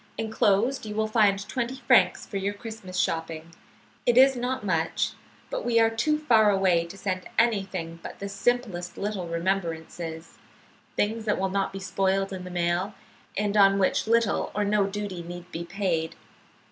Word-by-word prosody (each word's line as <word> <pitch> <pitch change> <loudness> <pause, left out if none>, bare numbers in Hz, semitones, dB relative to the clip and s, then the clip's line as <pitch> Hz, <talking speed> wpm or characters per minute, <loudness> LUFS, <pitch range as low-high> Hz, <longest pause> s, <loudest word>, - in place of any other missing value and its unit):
Enclosed 225 +3 +1
you 210 - -5
will 220 0 +1
find 205 -2 +2
twenty 250 +2 -2
francs 180 -1 +4
for 200 - -5
your 200 +1 -2
Christmas 205 -4 -8
shopping. 165 -1 -2 0.6
It 240 0 +4
is 265 +1 +7
not 250 -1 -2
much, 165 -4 0 0.4
but - - -2
we 230 -1 +3
are 225 0 +4
too 270 +7 +1
far 230 -8 +4
away 190 -4 +3
to 170 +4 -10
send 185 -2 -3
anything 195 -7 0
but - - -8
the 200 - -5
simplest 200 -3 -1
little 200 -3 -3
remembrances, 165 -2 -3 0.6
things 220 +2 0
that 210 - +1
will 190 0 0
not 195 0 0
be 195 - -6
spoiled 195 0 0
in 185 -1 -6
the - - -7
mail, 175 +3 -1 0.4
and 205 0 0
on 195 -1 +6
which 195 +2 +1
little 230 -2 +2
or 210 - +1
no 205 -1 +2
duty 200 -3 -4
need 175 +1 -9
be 165 - -4
paid. 170 -3 -1
195 Hz, 170 wpm, -26 LUFS, 180-220 Hz, 0.6 s, is